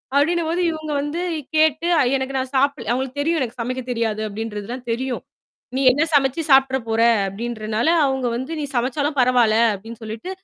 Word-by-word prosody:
அப்படின்னும்போது 335 +3 +1
இவங்க 310 -1 -6
வந்து 295 +5 -3 0.3
கேட்டு 315 +2 +3 0.3
எனக்கு 265 +1 -4
நான் 260 +1 -3
சாப்பிடல 270 -5 0
அவுங்களுக்கு 260 +2 -2
தெரியும். 325 +2 +1
எனக்கு 245 -1 -4
சமைக்க 255 +2 -3
தெரியாது 225 -3 -1
அப்படின்றதுல்லாம் 225 +3 -6
தெரியும். 250 +2 -3 0.5
நீ - - 0
என்ன 290 - 0
சமைச்சு 275 +3 +2
சாப்ட்ற 265 -1 +5
போற, 225 0 0 0.3
அப்படின்றனால 220 +3 -2 0.2
அவங்க 265 -2 0
வந்து 260 +6 -5
"நீ - - -2
சமைச்சாலும் 285 +4 -1
பரவால்ல" 245 -3 +4 0.2
அப்படின்னு 225 +4 -10
சொல்லிட்டு 220 +11 -6
260 Hz, 155 wpm, -21 LUFS, 230-285 Hz, 0.5 s, சாப்ட்ற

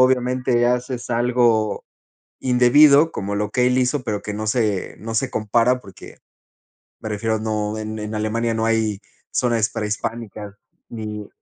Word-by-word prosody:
obviamente 125 -1 +2
haces 125 0 -2
algo 120 -3 +1 0.6
indebido 140 +5 +5
como 100 +1 -3
lo 105 0 -1
que 125 -1 +2
él 125 0 +2
hizo, 130 +2 +1
pero 105 -4 -3
que 105 - -5
no 110 +1 -4
se 110 -4 -1
no 115 +1 -6
se 130 +3 +1
compara, 115 +4 +2
porque 95 -1 -13 0.8
me 110 - -5
refiero 110 +2 -1
a - - -5
no, 105 -1 -2
en 110 0 -5
en 105 +1 -5
Alemania 115 +2 -1
no 110 0 -1
hay 110 -3 0 0.3
zonas 115 -3 +1
prehispánicas 105 -1 -4 0.3
ni 105 -2 -6
115 Hz, 150 wpm, -21 LUFS, 105-125 Hz, 0.8 s, indebido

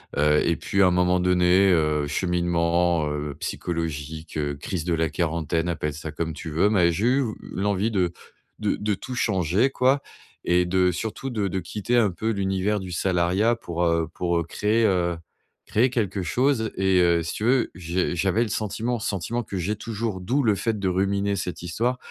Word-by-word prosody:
Heu 75 +1 +4
et 85 - +2
puis, 100 -1 +1
à - - +6
un - - +3
moment 90 0 +2
donné, 90 +1 +4
heu, 75 -3 +2
cheminement, 85 0 +1
heu, 75 -1 -3
psychologique, 80 -2 -4
heu, 75 -1 -1
crise 80 +3 -4
de 85 - 0
la 80 -1 +1
quarantaine, 80 +1 -1
appelle 75 -3 -2
ça 75 0 -6
comme 80 -1 -3
tu 80 - -7
veux, 90 +7 +3
mais 90 -5 +3
j'ai 100 +8 0
eu 135 +2 +3
ve 110 -3 -3 0.2
l'envie 100 +2 0
de 90 -5 0 0.5
de - - 0
de 105 0 -1
tout 125 +7 -6
changer, 100 - +1
quoi 135 +2 +2 0.4
et 90 0 +3
de 90 0 +3
surtout 110 +8 -4
de 105 -4 -1
de 95 +1 -2
quitter 105 +7 -1
un 105 -5 +3
peu 110 +6 -3
l'univers 100 0 0
du 95 -1 -7
salariat 95 +6 +1
pour, 85 -6 -3
heu, 85 -1 +1
pour, 85 -1 0
heu, 85 - +1
créer, 105 +7 0
heu, 85 -3 +1 0.5
créer 120 +5 +2
quelque 105 -6 -1
chose 115 - +1
et 95 -1 +3
heu, 85 -1 +3
si 80 - -4
tu 105 - -5
veux, 125 0 +2
j'ai 90 +1 -1
j'avais 95 +7 +2
le 115 - -4
sentiment, 115 +3 -2
sentiment 110 +2 -2
que 100 - -6
j'ai 100 +5 -2
toujours, 110 -2 -4
d'où 130 +10 0
le 105 -3 +3
fait 110 +2 -1
de 100 -2 0
ruminer 100 +2 0
cette 90 -1 -4
histoire, 115 +9 -1
90 Hz, 195 wpm, -24 LUFS, 85-105 Hz, 0.5 s, à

